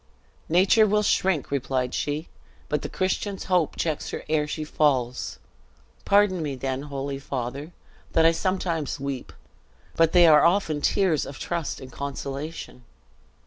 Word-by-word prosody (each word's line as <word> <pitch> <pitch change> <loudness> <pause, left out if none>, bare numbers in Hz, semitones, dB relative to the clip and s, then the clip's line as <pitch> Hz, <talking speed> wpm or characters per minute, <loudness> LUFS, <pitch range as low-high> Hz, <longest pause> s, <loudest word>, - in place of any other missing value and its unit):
"Nature 190 +6 +5
will 210 +1 +2
shrink," 185 -8 +1
replied 130 -2 -1
she; 150 +3 -2 0.4
"but 150 -1 0
the - - -5
Christian's 190 +1 -2
hope 180 -5 +1
checks 155 -3 -2
her - - -5
ere 150 -1 +1
she 155 +1 -4
falls. 130 -5 0 0.7
Pardon 200 -3 +3
me 145 -3 -3
then, 130 +1 -3
holy 140 -1 -4
father, 140 +3 -5 0.4
that 165 - +4
I 165 - +7
sometimes 165 -3 -2
weep; 135 -2 -5 0.6
but 165 -1 +4
they 175 -1 +7
are 150 -2 +7
often 170 -4 +2
tears 170 -2 +2
of 135 - -8
trust 170 -3 -3
and 130 -1 -10
consolation." 140 0 -6
155 Hz, 145 wpm, -25 LUFS, 140-175 Hz, 0.7 s, I